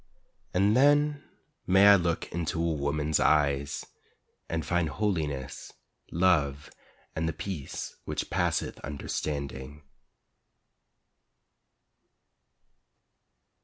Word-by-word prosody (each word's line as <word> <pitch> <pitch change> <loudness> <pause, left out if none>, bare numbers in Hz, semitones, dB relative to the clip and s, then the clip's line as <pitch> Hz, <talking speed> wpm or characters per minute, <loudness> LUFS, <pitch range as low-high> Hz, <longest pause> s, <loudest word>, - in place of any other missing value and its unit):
And 100 +4 +3
then 145 +2 +4 0.4
may 95 +3 +7
I 100 - +9
look 85 -3 0
into 85 0 -2
a 85 0 +1
woman's 75 +1 0
eyes 70 -2 +2 0.6
And 80 -2 -2
find 85 0 +1
holiness, 75 -11 -3 0.4
love 75 -5 +1 0.4
and 80 +1 0
the - - -3
peace 85 -2 -6
which - - -4
passeth 85 -2 0
understanding. 70 -1 -5
80 Hz, 85 wpm, -28 LUFS, 75-95 Hz, 0.6 s, I